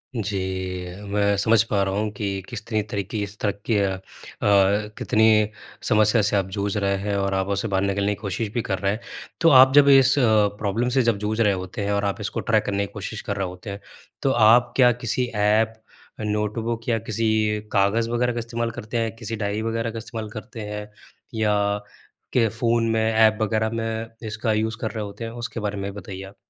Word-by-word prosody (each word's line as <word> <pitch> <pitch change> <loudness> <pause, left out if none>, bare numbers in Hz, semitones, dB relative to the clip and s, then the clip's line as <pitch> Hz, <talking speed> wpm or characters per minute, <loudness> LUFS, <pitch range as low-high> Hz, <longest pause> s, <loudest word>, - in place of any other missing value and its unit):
जी। 105 -3 -2 0.7
मैं 100 0 +2
समझ 110 +2 +4
पा 100 -2 +2
रहा 95 0 -1
हूँ 105 +2 -1
कि 100 -2 -2
कितनी 110 0 -2
तरह 100 - -1
की 110 - -2
इस 100 +1 -8
तरह 105 - +1
की 115 - +2
अ, 100 -1 +2
अ, - - -9 1.0
कितनी 110 -1 +3 0.4
समस्या 110 +1 +4
से 105 0 +1
आप 95 -2 +1
जूझ 100 0 -1
रहे 100 -1 +1
हैं 100 +1 -2
और 100 0 0
आप 95 0 0
उसे 100 +3 -2
बाहर 95 -2 0
निकलने 100 +1 0
की - - -20
कोशिश 105 +1 -2
भी 120 - 0
कर 95 -3 -2
रहे 100 +1 +1
हैं। 105 - -3 0.4
तो 165 - +6
आप 130 -2 +8
जब 145 -1 +7
इस 135 0 +6
अ, - - +3 0.4
प्रॉब्लम 110 +4 -1
से 130 +1 +2
जब 115 -3 +2
जूझ 105 +2 -2
रहे 105 -3 +4
होते 95 +2 -4
हैं 100 - -1
और 100 0 0
आप 100 -3 -2
इसको - - -3
ट्रैक - - +1
करने 100 0 0
की - - -21
कोशिश 105 +1 -5
कर 100 - -3
रहे 95 -1 -1
होते 90 +4 -9
हैं, 100 0 -6 0.4
तो 135 - +2
आप 120 +1 +5
क्या 125 -2 +6
किसी 120 +2 0
ऐप, 105 +2 +2 0.5
नोटबुक 110 +2 -2
या 115 - +2
किसी 110 +1 0 0.4
कागज़ 105 +4 +2
वगैरह 120 +1 +1
का 120 - -3
इस्तेमाल 115 0 -3
करते 110 +1 -5
हैं, 115 -1 -1
किसी 115 -1 -5
डायरी 105 0 -2
वगैरह 115 0 -2
का 115 - -7
इस्तेमाल 110 -1 -6
करते 110 +1 -8
हैं? 105 0 -6 0.4
या 110 -2 +1 0.8
के 115 -3 +4
फ़ोन 115 +1 +1
में 110 0 +1
एप 110 -1 +4
वगैरह 110 0 +1
में 115 0 -3 0.2
इसका 110 +1 -1
यूज़ 110 +1 -1
कर 110 - -2
रहे 110 -2 -4
होते 100 +3 -7
हैं? 115 - -4
उसके 120 0 -5
बारे 105 -1 -3
में 100 0 -4
बताइए 95 -1 -8
आप। 95 +1 -11
110 Hz, 215 wpm, -23 LUFS, 100-115 Hz, 1.0 s, आप